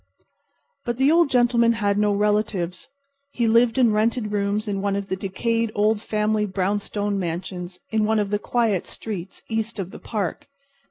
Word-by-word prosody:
But 240 -2 -2
the 270 +3 +4
Old 335 -2 +4
Gentleman 240 -2 +4
had 205 -2 0
no 210 0 +3
relatives. 205 -3 0 0.5
He 235 -2 +1
lived 230 +1 +4
in 245 -4 +5
rented 215 0 +1
rooms 205 +1 -1
in 200 -1 -2
one 200 0 0
of 200 0 -4
the 190 - 0
decayed 225 +4 -1
old 210 +1 +2
family 215 -1 0
brownstone 205 +1 -1
mansions 180 +1 -5
in 220 -1 +2
one 220 +1 +2
of 205 -1 0
the 205 - +1
quiet 220 -6 0
streets 195 -4 -7
east 225 0 -2
of 190 -2 -4
the - - -10
park. 205 -6 -4
210 Hz, 170 wpm, -23 LUFS, 200-230 Hz, 0.5 s, in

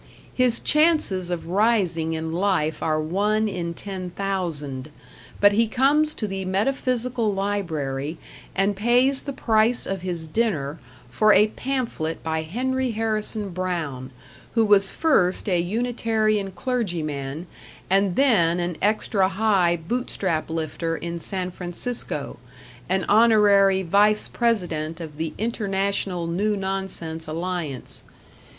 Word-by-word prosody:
His 250 -2 +2
chances 300 - +2
of 175 -2 -3
rising 185 -6 +1
in 160 0 -3
life 170 -4 0
are 155 -1 +1
one 205 +7 +1
in 170 -4 -4
ten 190 -2 -6
thousand; 165 -8 -3 0.5
but 205 0 +6
he 225 +3 +2
comes 285 +6 +2
to 215 - -3
the 195 -1 -4
Metaphysical 240 +3 0
Library, 160 -8 -2 0.4
and 195 +1 +2
pays 245 +6 +3
the 280 - -5
price 230 -2 +2
of 195 -1 -3
his 175 -3 -2
dinner 155 -6 -1 0.3
for 215 - +4
a 210 +1 +5
pamphlet 235 -11 -3
by 160 0 -1
Henry 255 +10 -1
Harrison 215 -1 -1
Brown, 165 -8 -3 0.5
who 225 -1 +4
was 200 -2 +4
first 200 - +2
a 180 -3 +2
Unitarian 215 0 0
clergyman, 170 - -3 0.4
and 195 -1 +2
then 180 -11 +3
an 175 -1 -2
extra 205 -2 +2
high 195 -4 +2
Bootstrap 175 -3 -2
lifter 165 +1 -2
in 170 0 -5
San 185 +2 -3
Francisco, 175 - -3 0.5
an 190 +1 +1
Honorary 205 -3 +5
Vice 205 +4 +3
President 175 -9 -1
of 155 -3 -8
the 160 -1 -3
International 200 -5 -1
New 200 +5 0
Nonsense 190 -4 -4
Alliance. 165 -4 -4
195 Hz, 120 wpm, -24 LUFS, 165-220 Hz, 0.5 s, but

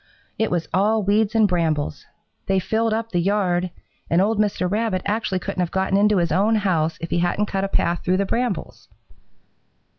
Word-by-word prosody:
It 220 - +1
was 175 -2 -1
all 210 +4 +2
weeds 210 +2 +1
and 220 -2 +5
brambles. 160 - -1 0.4
They 195 - +2
filled 220 +4 0
up 225 +1 -2
the 175 - +1
yard, 180 -1 +1 0.4
and 170 - +3
old 210 +3 +1
Mr. 205 -3 +1
Rabbit 205 -1 -1
actually 205 -2 -1
couldn't 190 +1 -5
have 180 -2 0
gotten 190 +1 0
into 205 +1 +4
his 170 -2 +1
own 205 +7 +3
house 165 -6 0
if 165 - -6
he 175 - +1
hadn't 175 +4 +1
cut 195 -1 -2
a - - -1
path 175 -3 -1
through 185 +1 +1
the 200 - +1
brambles. 235 -2 -3
195 Hz, 190 wpm, -22 LUFS, 175-210 Hz, 0.4 s, and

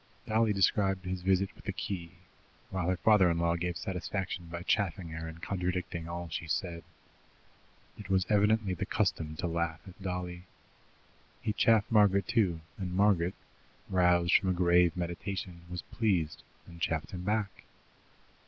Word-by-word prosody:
Dolly 110 0 +2
described 95 -1 +2
his 90 0 -3
visit 95 +3 +2
with - - -17
the 100 - -1
key, 95 -4 -5 0.6
while 90 -2 -1
her 95 - +1
father 105 -3 +5
in 85 - +1
law 85 0 +2
gave 85 0 -2
satisfaction 95 -2 -3
by 85 +1 -6
chaffing 95 -3 0
her 80 0 -5
and 80 +1 -10
contradicting 90 -3 -2
all 85 0 -4
she 80 +1 -5
said. 85 0 -2 1.2
It 100 -2 -9
was 95 -1 +3
evidently 105 -1 +3
the 90 - -3
custom 80 -1 0
to 80 - -3
laugh 85 -1 -1
at 95 +1 -13
Dolly. 90 -1 -4 1.0
He 110 -2 0
chaffed 110 +1 +3
Margaret, 100 -3 +4
too, 100 -9 +1 0.2
and 90 -2 -3
Margaret, 95 -3 +3 0.5
roused 90 -1 +3
from 95 - +4
a - - +3
grave 90 -1 +4
meditation, 90 0 -4
was 90 -1 -5
pleased, 95 -9 0 0.2
and 85 -1 -13
chaffed 80 -2 -1
him 90 - -5
back. 105 0 -2
90 Hz, 155 wpm, -31 LUFS, 85-100 Hz, 1.2 s, father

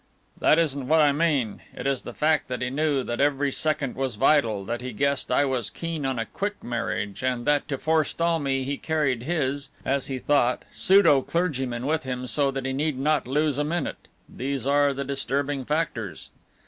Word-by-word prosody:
"That 155 - +5
isn't 140 -5 0
what 160 +3 +4
I 150 -2 +5
mean. 140 -8 0 0.2
It - - -6
is 135 -2 0
the 120 - -9
fact 155 0 +2
that 125 -1 -3
he 125 - -2
knew 145 -1 +1
that 120 +2 -2
every 145 0 +2
second 150 -2 -1
was 130 -3 -2
vital, 115 -5 +2
that 120 +3 -3
he 125 -1 -5
guessed 140 +3 0
I 140 +3 +4
was 130 -3 -1
keen 165 -4 -4
on 130 -2 -1
a 115 - -1
quick 205 - -4
marriage 115 -4 -3
and 125 -2 -1
that 145 -1 +2
to 140 -2 -2
forestall 160 +2 +1
me 135 -2 0
he 140 +2 -3
carried 150 -7 0
his 140 -1 -1 0.2
(as 135 0 0
he 135 - -3
thought) 125 -2 +2
pseudo 190 -8 +5
clergyman 130 -8 -2
with 160 +2 +1
him 125 -2 -4
so 140 +3 +1
that 135 -1 -4
he 135 - -1
need 145 0 -1
not 150 0 +1
lose 145 +1 +1
a - - +2
minute: 160 0 -3 0.2
these 135 0 -4
are 145 0 +3
the 140 0 -3
disturbing 140 0 -2
factors." 125 - -3
140 Hz, 200 wpm, -25 LUFS, 130-150 Hz, 0.2 s, That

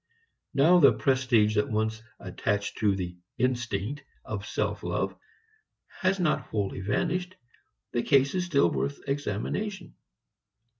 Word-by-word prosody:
Now 165 +6 +6
the 140 - +7
prestige 130 -6 +2
that 105 +7 +2
once 110 0 -1 0.2
attached 100 0 -2
to 105 -3 +3
the 90 -2 -5 0.2
"instinct" 125 0 -1 0.2
of - - -5
self - - -2
love - - -2 0.8
has 190 +1 +1
not 175 -4 +2
wholly 100 -3 -3
vanished. 180 - -1 0.6
The 120 - 0
case 140 +1 +3
is 185 -1 0
still 140 - +3
worth 70 +1 -2
examination. 145 - -3
125 Hz, 120 wpm, -28 LUFS, 105-155 Hz, 0.8 s, the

